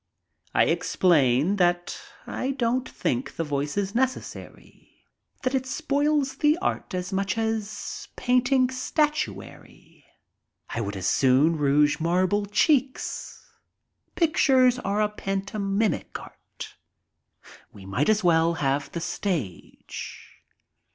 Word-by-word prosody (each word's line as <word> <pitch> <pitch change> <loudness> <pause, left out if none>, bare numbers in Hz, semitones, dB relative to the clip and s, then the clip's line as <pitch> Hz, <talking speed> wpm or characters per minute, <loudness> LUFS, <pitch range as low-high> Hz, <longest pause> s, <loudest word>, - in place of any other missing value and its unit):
I - - +5
ex - - -1
plain 155 +1 +3
that 175 -1 0 0.2
I 265 +2 -3
don't 250 +1 0
think 125 +1 -2
the 165 - -1
voice 145 +1 -3
is 200 -1 -1
necessary, 260 +2 -5 0.4
that 255 0 0
it 260 -1 0
spoils 290 -1 0
the 300 +3 +3
art 345 - -3
as 180 +2 -4
much 195 +2 -1
as 220 -2 -3
painting 250 +1 +2
statuary. 300 +4 -3 0.7
I 115 - -2
would 100 -2 -4
as 95 - -5
soon 135 - +4
rouge 145 0 +3
marble 185 +5 +1
cheeks. 260 +6 0 0.7
Pictures 265 -7 +3
are 210 +2 0
pantomimic 200 +1 -2
art. - - -11 1.0
We 100 -2 -13
might 125 - 0
as 215 -1 +3
well 165 -1 +3
have 140 -1 -1
the 170 - -3
stage. 165 - -5
200 Hz, 110 wpm, -25 LUFS, 160-255 Hz, 1.0 s, I